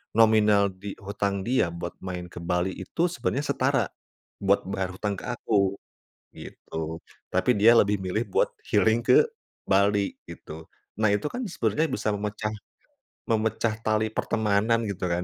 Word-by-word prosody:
nominal 105 Hz, -3 st, +5 dB
di 95 Hz, +2 st, -8 dB
hutang 100 Hz, 0 st, -2 dB
dia 125 Hz, -3 st, +2 dB
buat 85 Hz, 0 st, -5 dB
main 90 Hz, -2 st, -6 dB
ke -, -, -8 dB
Bali 90 Hz, +2 st, 0 dB
itu 170 Hz, +1 st, -1 dB
sebenarnya 145 Hz, -5 st, -1 dB
setara 130 Hz, -5 st, +1 dB, 0.5 s
buat 100 Hz, 0 st, +2 dB
bayar 95 Hz, -1 st, -3 dB
hutang 100 Hz, 0 st, -3 dB
ke -, -, -8 dB
aku, 100 Hz, -5 st, +1 dB, 0.6 s
gitu. 80 Hz, +1 st, -7 dB, 0.2 s
Tapi -, -, +1 dB
dia 115 Hz, +3 st, +7 dB
lebih 105 Hz, -2 st, +3 dB
milih 95 Hz, +5 st, -1 dB
buat -, -, +3 dB, 0.2 s
healing 115 Hz, +1 st, +2 dB
ke 455 Hz, -, +5 dB, 0.4 s
Bali, 100 Hz, +1 st, +2 dB
gitu. 80 Hz, +1 st, -10 dB, 0.3 s
Nah, 110 Hz, -1 st, +2 dB
itu 105 Hz, +8 st, 0 dB
kan 245 Hz, +9 st, -4 dB
sebenarnya 165 Hz, -4 st, 0 dB
bisa 130 Hz, -, -2 dB
memecah 105 Hz, +1 st, -3 dB, 0.8 s
memecah 110 Hz, 0 st, +1 dB
tali 110 Hz, 0 st, +1 dB
pertemanan 110 Hz, +1 st, +1 dB
gitu 90 Hz, -1 st, -3 dB
kan, 85 Hz, 0 st, -1 dB
105 Hz, 145 wpm, -26 LUFS, 95-115 Hz, 0.8 s, dia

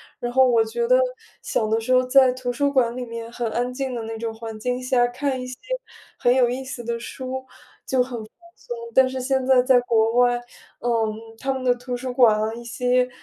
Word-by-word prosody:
展。 -, -, -20 dB
然 240 Hz, 0 st, -3 dB
后 260 Hz, 0 st, +5 dB
我 230 Hz, -2 st, +4 dB
觉 470 Hz, -, -2 dB
得 -, -, +6 dB, 0.4 s
小 215 Hz, -, -1 dB
的 220 Hz, +1 st, +2 dB
时 255 Hz, +3 st, -1 dB
候 255 Hz, -, +5 dB
在 255 Hz, 0 st, +5 dB
图 250 Hz, -1 st, -3 dB
书 280 Hz, +2 st, 0 dB
馆 245 Hz, -3 st, +2 dB
里 255 Hz, -, -3 dB
面 230 Hz, 0 st, -7 dB
很 240 Hz, -1 st, -3 dB
安 245 Hz, +1 st, -1 dB
静 260 Hz, 0 st, -3 dB
的 235 Hz, -, -4 dB
那 225 Hz, 0 st, -5 dB
种 225 Hz, -1 st, -4 dB
环 225 Hz, -1 st, -7 dB
境 250 Hz, +3 st, -2 dB
下， 250 Hz, -1 st, +3 dB
看 260 Hz, +1 st, -2 dB
一 255 Hz, -, -5 dB
些 250 Hz, -1 st, -7 dB, 0.6 s
很 245 Hz, -, +3 dB
有 250 Hz, -2 st, +4 dB
意 260 Hz, +2 st, -4 dB
思 260 Hz, -2 st, -6 dB
的 235 Hz, 0 st, -3 dB
书 250 Hz, +2 st, -8 dB
就 260 Hz, -, -1 dB
很 260 Hz, -, -7 dB
放 -, -, -34 dB, 1.1 s
松。 480 Hz, -, -7 dB, 0.2 s
但 265 Hz, 0 st, +6 dB
是 260 Hz, -, -4 dB
现 265 Hz, 0 st, 0 dB
在 260 Hz, -1 st, +5 dB
在 255 Hz, -1 st, +5 dB
国 225 Hz, -2 st, +2 dB
外， 245 Hz, 0 st, +4 dB, 0.4 s
嗯， 225 Hz, -2 st, 0 dB, 0.2 s
他 270 Hz, +3 st, -1 dB
们 265 Hz, -1 st, -4 dB
的 245 Hz, -1 st, +4 dB
图 245 Hz, +1 st, -6 dB
书 255 Hz, 0 st, -4 dB
馆 235 Hz, -4 st, +5 dB
啊， 215 Hz, +1 st, -1 dB
一 240 Hz, -, -8 dB
些， 250 Hz, +1 st, +1 dB
245 Hz, 250 characters per minute, -23 LUFS, 235-260 Hz, 1.1 s, 得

